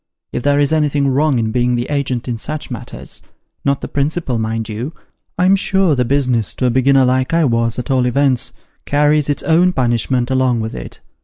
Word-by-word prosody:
If - - -3
there 145 +2 +2
is 145 +2 +2
anything 145 -2 +1
wrong 140 +1 +2
in 110 -1 -1
being 125 +1 +1
the 120 0 -1
agent 135 -4 -2
in 120 -2 -3
such 155 +3 -5
matters 120 - -8 0.4
not 140 0 0
the - - -4
principal, 140 -3 -1
mind 110 0 -2
you 120 +9 -5 0.4
I'm 185 +2 +4
sure 190 -3 +2
the 125 -3 +1
business, 125 -4 0
to 130 - -1
a 125 - +3
beginner 130 +1 +3
like 130 +4 +1
I 165 -2 +3
was, 115 -2 0
at 125 +3 -4
all 130 -2 +2
events, 130 0 +1 0.3
carries 150 0 +2
its 145 - -1
own 175 +2 +3
punishment 120 0 0
along 130 -2 +2
with 110 0 -4
it. - - -9
130 Hz, 200 wpm, -17 LUFS, 120-145 Hz, 0.4 s, I'm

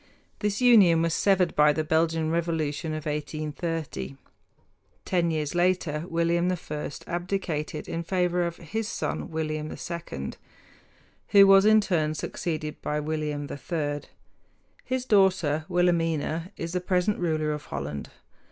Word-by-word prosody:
This 210 +2 -1
union 195 -10 +6
was 165 -1 +1
severed 190 -2 +2
by 150 0 +5
the 155 - -1
Belgian 160 0 +1
revolution 160 -2 -1
of 155 - -6
1830. 150 - -4 0.9
Ten 175 -2 +1
years 155 -3 -1
later, 175 -3 +1
William 170 +2 +1
I 150 -4 -4 0.2
abdicated 175 -4 -3
in 165 - -3
favor 180 0 0
of 170 -1 -2
his 210 +6 -4
son - - -3
William 155 -1 -3
II, 165 - -5 0.9
who 200 -1 +7
was 195 0 +7
in 215 0 +6
turn 155 -6 0
succeeded 155 -1 -4
by 150 0 -1
William 150 -1 -3
III. 145 -1 -3 0.8
His 255 0 -2
daughter 185 - +3
Wilhelmina 170 -1 +1
is 165 0 -4
the 180 0 -1
present 180 +2 +1
ruler 155 -3 0
of 150 0 -5
Holland. 70 0 -5
165 Hz, 130 wpm, -27 LUFS, 155-180 Hz, 0.9 s, who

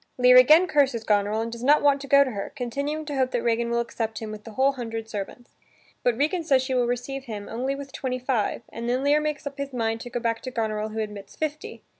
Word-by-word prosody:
Lear 250 0 +6
again 305 +8 +7
curses 275 -9 +2
Goneril 210 +1 +1
and 230 0 -4
does 235 +1 -7
not 290 +3 +4
want 285 -1 +4
to 275 - -8
go 280 +1 +6
to 260 - -4
her, 200 -3 -5
continuing 285 +4 -3
to 295 -1 -4
hope 260 -1 +1
that 245 -2 -2
Regan 235 0 +1
will 235 0 +1
accept 225 -1 -3
him 220 -1 -5
with 210 -1 -9
the 225 - -9
whole 265 +4 +3
hundred 225 -4 -5
servants. 225 +3 -7 0.5
But 245 -2 +1
Regan 315 +5 0
says 270 -5 +3
she 260 0 -3
will 245 -1 +2
receive 265 +3 -3
him 210 -4 -6
only 255 +4 -2
with 275 -1 -8
twenty 255 -2 -3
five 245 -3 -1
and 235 +1 -5
then 255 +2 0
Lear 290 +1 +4
makes 300 -1 -3
up 280 0 -6
his 280 -1 -4
mind 225 -2 -1
to 245 - -7
go 240 0 -3
back 230 -1 -1
to 255 - -5
Goneril 220 -3 -2
who 220 +1 -3
admits 210 -2 -7
fifty. 305 0 -5
245 Hz, 255 wpm, -25 LUFS, 225-275 Hz, 0.5 s, again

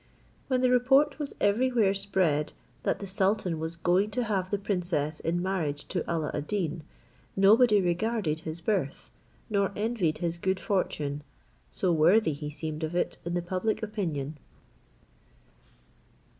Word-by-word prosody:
When 255 -2 +1
the 255 -1 +3
report 270 +4 +4
was 290 -2 -4
everywhere 220 -1 +3
spread, 185 -7 0 0.3
that - - 0
the 200 - -5
sultan 190 -3 0
was 160 +1 -4
going 180 +5 +2
to 245 - +1
give 190 -3 0
the 205 - 0
princess 175 -6 -1
in 175 +2 -1
marriage 160 -7 -2
to - - -1
Alla 160 -3 -1
ad 150 - -3
Deen, 175 -6 -2 0.5
nobody 210 +3 +6
regarded 180 -2 0
his 160 +1 -7
birth, 175 -7 -2 0.4
nor 200 -2 +1
envied 205 -7 0
his 170 -1 -3
good 190 +1 0
fortune, 150 -7 -1 0.5
so 180 -3 0
worthy 165 +3 +4
he 150 +1 -5
seemed 155 +1 -5
of 160 +2 -3
it 175 - -1
in 170 0 -2
the 175 - -1
public 200 +5 -1
opinion. 160 -9 -3
185 Hz, 145 wpm, -28 LUFS, 160-210 Hz, 0.5 s, nobody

